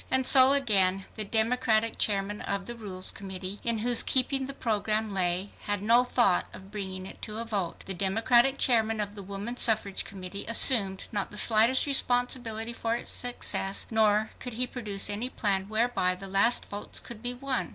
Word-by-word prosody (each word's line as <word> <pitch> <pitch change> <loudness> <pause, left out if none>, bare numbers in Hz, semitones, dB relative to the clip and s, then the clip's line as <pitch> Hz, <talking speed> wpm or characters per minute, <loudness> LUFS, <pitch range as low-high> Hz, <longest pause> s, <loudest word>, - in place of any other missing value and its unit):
And 260 0 +1
so 260 +1 +7
again 195 -8 +3
the 215 - -3
Democratic 225 +1 +1
Chairman 205 0 -1
of 200 -1 -4
the 240 - -6
Rules 195 -5 -2
Committee, 190 0 -7
in 235 -1 +1
whose 245 -1 +6
keeping 265 +1 0
the 275 - -6
program 215 -2 -2
lay, 185 +1 -1 0.2
had 205 -1 0
no 235 +3 +4
thought 240 -7 +1
of 190 +1 -13
bringing 190 -3 -6
it - - -11
to 215 -1 -6
a 230 - -4
vote. 200 -6 -4
The 190 - -4
Democratic 235 +8 +2
Chairman 225 -3 +1
of 205 -1 -3
the 205 - -9
Woman 200 +5 -6
Suffrage 215 -5 +1
Committee 195 0 -8
assumed 215 -4 +4
not 205 -2 -3
the 210 - -8
slightest 225 +4 +3
responsibility 245 -4 0
for 230 0 -2
its - - -6
success, 220 -5 -1
nor 220 -1 +1
could 250 - -6
he 250 +3 0
produce 215 -6 -1
any 210 +5 -3
plan 195 -5 -1
whereby 220 -5 0
the 195 - -10
last 195 +5 +2
votes 205 0 -3
could 235 -3 -11
be 245 +1 -3
won. 260 -1 -3
215 Hz, 185 wpm, -27 LUFS, 195-240 Hz, 0.2 s, so